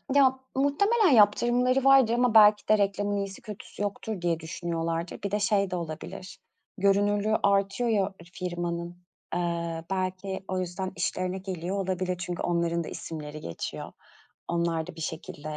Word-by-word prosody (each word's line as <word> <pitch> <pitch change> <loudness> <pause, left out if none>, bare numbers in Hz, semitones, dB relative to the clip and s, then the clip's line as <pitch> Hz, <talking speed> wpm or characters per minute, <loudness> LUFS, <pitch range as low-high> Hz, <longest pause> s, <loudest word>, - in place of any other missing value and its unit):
Ya, 265 -2 +5 0.2
muhtemelen 375 - +3
yaptırımları 240 +5 +4
vardır 270 -4 +6
ama 245 -1 +2
belki 210 -1 +7
de 215 - +5
reklamın 205 0 0
iyisi 195 -1 -4
kötüsü 210 -1 -9
yoktur 205 -1 -4
diye 170 -2 0
düşünüyorlardır. 165 0 -3
Bir 200 - -2
de 210 - +1
şey 200 -2 +1
de - - -1
olabilir. 170 +3 -6 0.4
Görünürlüğü 205 +2 +2
artıyor 200 +4 +2
ya 200 -3 +1 0.2
firmanın. 175 -1 -4 0.4
Eee, 170 -1 -2
belki 190 0 -2
o 185 0 -1
yüzden 185 +1 -3
işlerine 185 +1 -2
geliyor 185 0 -4
olabilir 185 -1 -1
çünkü 175 0 -4
onların 170 -1 0
da - - -8
isimleri 155 -2 -7
geçiyor. 85 - -6 0.6
Onlar 170 -1 0
da 180 - -9
bir - - -8
şekilde 155 -1 -5
190 Hz, 145 wpm, -27 LUFS, 170-205 Hz, 0.6 s, belki